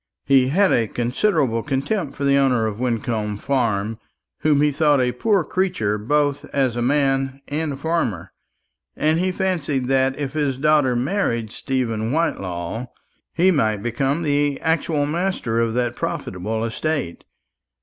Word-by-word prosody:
He 135 -2 +4
had 190 +8 +3
a 115 -2 +2
considerable 125 - 0
contempt 140 - -2
for 140 - -5
the 140 0 +4
owner 130 -5 +3
of 110 0 -3
Wyncomb 115 -4 -1
Farm, 115 -4 -1 0.4
whom 150 -2 +3
he 150 - +3
thought 145 -1 +3
a 125 -1 +2
poor 195 - +1
creature 125 - -1
both 145 +5 +1
as 130 -4 0
a 120 - -1
man 135 0 +1
and 150 0 -2
a - - -7
farmer; 135 - -2 0.6
and 155 +2 +1
he 185 +1 +1
fancied 165 -9 -1
that 135 0 +2
if 140 -2 -4
his 145 -4 0
daughter 145 -3 +3
married 120 - -1
Stephen 115 -5 -2
Whitelaw, 100 - -2 0.4
he 185 +3 +3
might 110 - +1
become 135 +7 -1
the 145 -2 +1
actual 160 -2 +1
master 160 -7 -1
of 115 -1 0
that 120 -1 0
profitable 110 +5 -3
estate. 135 - -3
135 Hz, 150 wpm, -22 LUFS, 115-150 Hz, 0.6 s, He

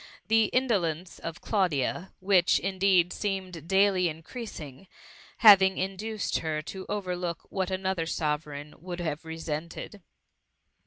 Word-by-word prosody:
The 225 0 +5
indolence 185 -9 0
of 165 0 -6
Claudia, 180 - 0
which, 185 -2 +4
indeed, 190 -2 +2
seemed 185 -6 -4
daily 190 -1 +3
increasing, 160 - -8 0.5
having 195 -5 +8
induced 200 +3 -2
her 155 -1 -2
to 190 +4 -8
over 190 -3 -2
look 175 -2 -4
what 190 -1 -1
another 190 -3 -1
Sovereign 150 -2 -3
would 175 +1 -6
have 160 -2 -3
re 160 0 -6
sented. 165 +5 -5
185 Hz, 120 wpm, -28 LUFS, 160-195 Hz, 0.5 s, having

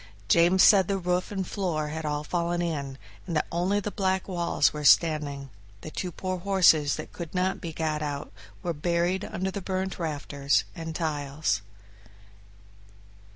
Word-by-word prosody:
James 175 +5 +5
said 195 -4 +7
the 195 - 0
roof 180 +1 -1
and 190 -2 -2
floor 165 -7 -2
had 160 0 -4
all 150 0 -2
fallen 175 +2 -1
in, 145 -6 -3 0.3
and 170 - -3
that 155 - +1
only 180 +4 +1
the 205 0 -4
black 190 -2 0
walls 170 -5 +1
were 150 0 -5
standing; 145 -3 +3 0.3
the 155 - -8
two 180 +2 -4
poor 185 +2 -4
horses 175 -6 +4
that - - -8
could 170 0 -7
not 185 +1 0
be 170 -4 -5
got 155 -1 -2
out 145 -1 -4 0.3
were 175 - -1
buried 175 +4 0
under 190 +2 -3
the 200 - -5
burnt 190 0 -3
rafters 145 -3 0
and 165 -2 -6
tiles. 145 - -1
170 Hz, 160 wpm, -27 LUFS, 150-185 Hz, 0.3 s, said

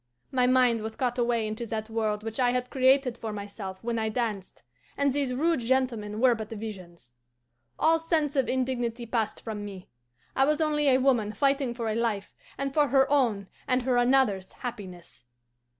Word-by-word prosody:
My 250 -1 +2
mind 250 -3 +3
was 220 0 -5
caught 250 -1 -1
away 235 -2 +1
into 215 +2 -4
that 220 -1 -3
world 215 -2 -1
which 225 +1 -5
I 250 -1 +4
had 250 0 -2
created 260 -2 +3
for 220 - -4
myself 200 -2 -7
when 230 0 -1
I 220 0 0
danced, 215 -4 -4 0.3
and 280 -1 +2
these 280 -2 0
rude 320 +5 +1
gentlemen 230 -4 -1
were 255 0 +5
but 220 -2 -6
visions. 185 - -8 0.6
All 325 +1 +3
sense 315 -3 0
of 270 -2 +1
indignity 245 -2 -1
passed 225 -2 -2
from 215 -2 -5
me. 195 -3 -9 0.5
I 270 - +4
was 300 +2 +1
only 300 -2 +1
a 255 - +5
woman 245 -6 +2
fighting 275 +1 +1
for 235 -2 -3
a 215 - 0
life 220 -3 -2 0.2
and 275 -1 -3
for 295 -1 +3
her 265 0 +4
own 230 -9 +2 0.2
and 255 -1 +1
her 250 -1 +1
another's 245 -7 +2
happiness. 185 - -8
240 Hz, 180 wpm, -27 LUFS, 215-265 Hz, 0.6 s, were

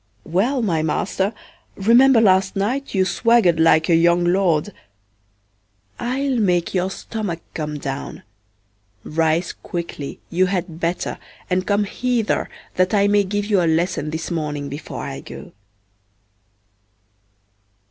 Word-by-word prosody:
Well, 230 - 0
my 165 -7 +1
master, 190 +5 -1 0.4
remember 235 +5 +5
last 190 -2 +3
night 235 +7 -2
you 190 -1 +3
swaggered 220 -6 +3
like 160 -1 +4
a 170 - +4
young 170 +1 +4
lord. 180 0 +2 1.3
I'll 260 +2 -1
make 180 -5 +1
your 185 0 0
stomach 195 -4 -5
come 150 -1 -4
down; 135 -1 -6 0.8
rise 165 +2 0
quickly, 170 -5 -6
you 185 +2 +2
had 180 -3 -3
better, 170 +1 -2 0.3
and 185 +1 0
come 205 0 +2
hither 240 +2 -1 0.3
that 185 +3 +2
I 200 0 +4
may 205 0 +3
give 205 +1 -2
you 205 -3 +2
a 170 - +2
lesson 165 -1 0
this 160 +2 -4
morning 150 -3 -3
before 145 +2 -7
I - - -5
go. - - -10
185 Hz, 125 wpm, -21 LUFS, 165-205 Hz, 1.3 s, remember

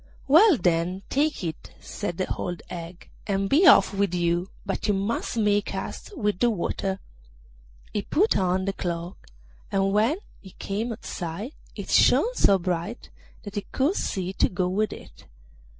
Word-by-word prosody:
'Well, 325 +4 +7
then, 175 +1 0
take 295 -4 +1
it,' 160 -2 -6
said 175 -5 -5
the 185 - 0
old 175 -1 -4
hag, 170 0 -8 0.2
'and 195 -1 0
be 320 - +5
off - - +7
with 195 -2 0
you, 175 +1 0 0.2
but 195 +2 -2
you 205 - +2
must 205 +4 -2
make 205 -2 +2
haste 410 - -6
with 210 -5 0
the 240 - +4
water.' 195 -1 -2 0.9
He 205 - 0
put 390 - +2
on 185 0 +1
the 195 - -1
cloak, 175 -1 -5 0.4
and 195 -1 +1
when 225 - +3 0.2
he 190 - -14
came 215 +5 -3
outside 195 - -5 0.2
it - - -6
shone 485 - +5
so 200 - +4
bright 180 +5 -4 0.3
that 205 - -8
he 205 - -2
could 280 +7 +2
see 185 - -2
to - - +2
go 180 0 -1
with 210 +4 0
it. - - -12
195 Hz, 165 wpm, -25 LUFS, 180-220 Hz, 0.9 s, Well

